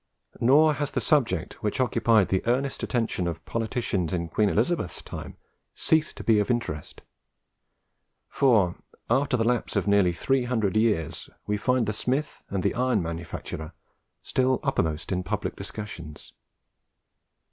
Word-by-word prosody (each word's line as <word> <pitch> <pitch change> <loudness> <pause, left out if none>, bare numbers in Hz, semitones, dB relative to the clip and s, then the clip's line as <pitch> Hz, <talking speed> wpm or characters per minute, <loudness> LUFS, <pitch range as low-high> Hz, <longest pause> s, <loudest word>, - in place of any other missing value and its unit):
Nor 150 +6 +5
has 145 -1 -2
the - - -1
subject 145 -6 0
which 105 +2 -2
occupied 115 -4 +3
the 95 - +1
earnest 130 +3 0
attention 115 -7 -1
of 85 - -5
politicians 110 -6 -1
in 85 -2 -2
Queen 105 +3 +2
Elizabeth's 110 - 0
time - - -8 0.4
ceased 160 -1 +1
to - - -6
be 110 -2 +4
of 105 - 0
interest; 120 - -3 1.2
for, 110 -10 +3 0.3
after 135 0 +3
the 115 - +1
lapse 120 0 0
of - - +1
nearly 100 -3 +4
three 130 +9 0
hundred 110 -5 0
years, 100 -9 0 0.2
we 105 - 0
find 125 +3 +1
the 105 - -1
smith 130 +7 -2
and 95 -2 -2
the - - +1
iron 125 -5 +1
manufacturer 80 -1 -6 0.5
still 130 -1 +1
uppermost 80 +1 -1
in 90 -1 0
public 90 - -3
discussions. 85 -8 -8
110 Hz, 145 wpm, -26 LUFS, 90-125 Hz, 1.2 s, Nor